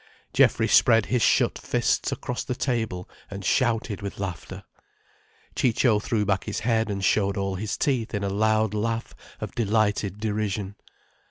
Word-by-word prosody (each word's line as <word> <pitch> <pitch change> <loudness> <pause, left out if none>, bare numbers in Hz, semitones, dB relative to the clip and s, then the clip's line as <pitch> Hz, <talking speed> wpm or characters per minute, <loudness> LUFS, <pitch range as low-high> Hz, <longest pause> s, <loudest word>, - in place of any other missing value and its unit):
Geoffrey - - +4
spread 115 -2 +5
his 125 -2 0
shut - - +3
fists - - 0
across 125 - -4
the 125 - -3
table 110 -9 -2 0.2
and 100 -1 -7
shouted 115 -4 +1
with 100 -1 -6
laughter, 95 -5 -6 0.9
Ciccio 115 -2 +2
threw 105 0 -1
back 95 -1 0
his 105 -1 -3
head 110 -1 +1
and 100 -1 -2
showed 100 -1 +2
all 95 -1 -1
his 100 +2 -3
teeth 120 -6 0
in 100 - -2
a 100 - 0
loud 110 +1 +1
laugh 115 +2 -2 0.3
of - - -6
delighted 105 -3 0
derision. 105 -2 -2
105 Hz, 155 wpm, -25 LUFS, 100-115 Hz, 0.9 s, spread